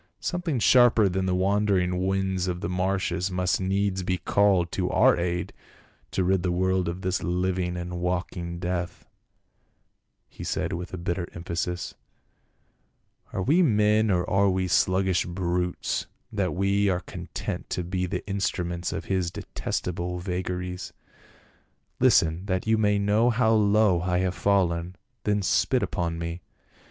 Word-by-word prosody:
" -, -, -49 dB
Something 175 Hz, -5 st, -1 dB
sharper 120 Hz, -1 st, +5 dB
than 95 Hz, 0 st, -1 dB
the 90 Hz, -, +1 dB
wandering 95 Hz, -2 st, +1 dB
winds 95 Hz, -1 st, 0 dB
of 90 Hz, 0 st, -3 dB
the -, -, -2 dB
marshes 90 Hz, 0 st, -1 dB
must 90 Hz, 0 st, 0 dB
needs 95 Hz, 0 st, 0 dB
be 90 Hz, 0 st, -1 dB
called 90 Hz, -1 st, +2 dB
to -, -, -1 dB
our -, -, +5 dB
aid 85 Hz, 0 st, -2 dB, 0.6 s
to 95 Hz, -, -1 dB
rid 95 Hz, 0 st, +2 dB
the 90 Hz, -, 0 dB
world 95 Hz, 0 st, +1 dB
of 90 Hz, +2 st, -5 dB
this 95 Hz, 0 st, 0 dB
hving 90 Hz, 0 st, -1 dB
and 90 Hz, 0 st, -5 dB
walking 90 Hz, -1 st, -3 dB
death," 90 Hz, 0 st, -3 dB, 1.2 s
he -, -, -10 dB
said -, -, -2 dB
with 90 Hz, 0 st, -6 dB
bitter 85 Hz, 0 st, -2 dB
emphasis. 85 Hz, 0 st, -3 dB, 1.4 s
"Are 95 Hz, -, -2 dB
we 160 Hz, -, +4 dB
men 105 Hz, -6 st, +3 dB
or 90 Hz, -2 st, +1 dB
are 100 Hz, +1 st, +3 dB
we 95 Hz, 0 st, 0 dB
sluggish 95 Hz, 0 st, +2 dB
brutes 90 Hz, 0 st, -2 dB, 0.2 s
that 100 Hz, -5 st, -1 dB
we 100 Hz, +2 st, +2 dB
are 90 Hz, -1 st, 0 dB
content -, -, -6 dB
to 90 Hz, -, -2 dB
be 90 Hz, +1 st, -2 dB
the 90 Hz, +2 st, -4 dB
instruments 90 Hz, -3 st, -2 dB
of -, -, -4 dB
his 95 Hz, -3 st, 0 dB
detest -, -, -4 dB
able 90 Hz, 0 st, -3 dB
vagaries? 90 Hz, 0 st, -4 dB, 1.1 s
Listen, 85 Hz, +4 st, +3 dB
that 95 Hz, -1 st, -1 dB
you 110 Hz, 0 st, +3 dB
may 105 Hz, -2 st, +2 dB
know 105 Hz, +4 st, +3 dB
how 115 Hz, -1 st, +3 dB
low 105 Hz, -4 st, +3 dB
I 90 Hz, 0 st, 0 dB
have 90 Hz, 0 st, 0 dB
fallen, 90 Hz, -3 st, +1 dB, 0.3 s
then 105 Hz, -1 st, +1 dB
spit -, -, +2 dB
upon 85 Hz, -1 st, -2 dB
me. 85 Hz, +1 st, -5 dB
90 Hz, 150 wpm, -26 LUFS, 90-100 Hz, 1.4 s, sharper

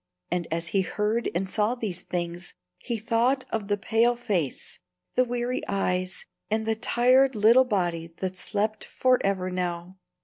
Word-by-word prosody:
And 175 Hz, -1 st, -1 dB
as 165 Hz, +1 st, -2 dB
he 195 Hz, -, +2 dB
heard 210 Hz, +4 st, -1 dB
and 190 Hz, +2 st, 0 dB
saw 210 Hz, +5 st, +1 dB
these 200 Hz, -7 st, -4 dB
things, 175 Hz, 0 st, -4 dB, 0.2 s
he 235 Hz, -, -3 dB
thought 235 Hz, +4 st, +1 dB
of 215 Hz, -3 st, -2 dB
the 205 Hz, 0 st, +1 dB
pale 230 Hz, +4 st, +2 dB
face, 190 Hz, -, -2 dB, 0.3 s
the 255 Hz, -, +4 dB
weary 245 Hz, 0 st, -2 dB
eyes, 185 Hz, -1 st, -1 dB, 0.2 s
and 220 Hz, +1 st, 0 dB
the 225 Hz, -, +2 dB
tired 250 Hz, +3 st, +3 dB
little 230 Hz, +5 st, +6 dB
body 175 Hz, -7 st, -1 dB
that 185 Hz, -1 st, -3 dB
slept 210 Hz, +3 st, -1 dB
forever 195 Hz, -8 st, +1 dB
now. 180 Hz, 0 st, -3 dB
210 Hz, 150 wpm, -26 LUFS, 180-235 Hz, 0.3 s, little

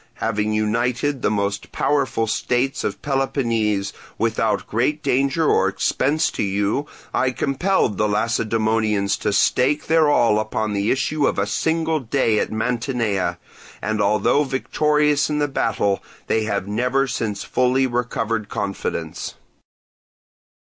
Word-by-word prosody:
Having 110 Hz, -1 st, -1 dB
united 120 Hz, +6 st, 0 dB
the -, -, +2 dB
most 100 Hz, -1 st, -2 dB
powerful 140 Hz, -5 st, 0 dB
states 125 Hz, +4 st, -1 dB
of -, -, -4 dB
Peloponnese, 115 Hz, -8 st, 0 dB, 0.2 s
without 110 Hz, -2 st, 0 dB
great 140 Hz, +7 st, -1 dB
danger 140 Hz, +5 st, +1 dB
or -, -, +3 dB
expense 150 Hz, +4 st, +1 dB
to -, -, -4 dB
you, 105 Hz, +8 st, 0 dB, 0.3 s
I 130 Hz, -, +2 dB
compelled 135 Hz, -, 0 dB
the 105 Hz, -, +3 dB
Lacedaemonians 110 Hz, -1 st, +1 dB
to -, -, -1 dB
stake 130 Hz, +7 st, +2 dB
their 160 Hz, -1 st, +4 dB
all 115 Hz, -7 st, +3 dB
upon 110 Hz, 0 st, -2 dB
the 100 Hz, +2 st, 0 dB
issue 140 Hz, +2 st, +1 dB
of -, -, -1 dB
a 100 Hz, -, +1 dB
single 160 Hz, +7 st, 0 dB
day 115 Hz, -4 st, +1 dB
at -, -, -2 dB
Mantinea; 115 Hz, -3 st, -1 dB, 0.4 s
and 110 Hz, -1 st, -1 dB
although 105 Hz, +8 st, +3 dB
victorious 150 Hz, +2 st, +1 dB
in 150 Hz, -, -1 dB
the 145 Hz, 0 st, +1 dB
battle, 100 Hz, -7 st, 0 dB, 0.2 s
they 110 Hz, -1 st, 0 dB
have 100 Hz, -2 st, -2 dB
never 125 Hz, +6 st, +1 dB
since 110 Hz, -5 st, -3 dB
fully 130 Hz, +1 st, +2 dB
recovered 115 Hz, -3 st, -2 dB
confidence. 100 Hz, -1 st, -4 dB
115 Hz, 130 wpm, -21 LUFS, 105-135 Hz, 0.4 s, their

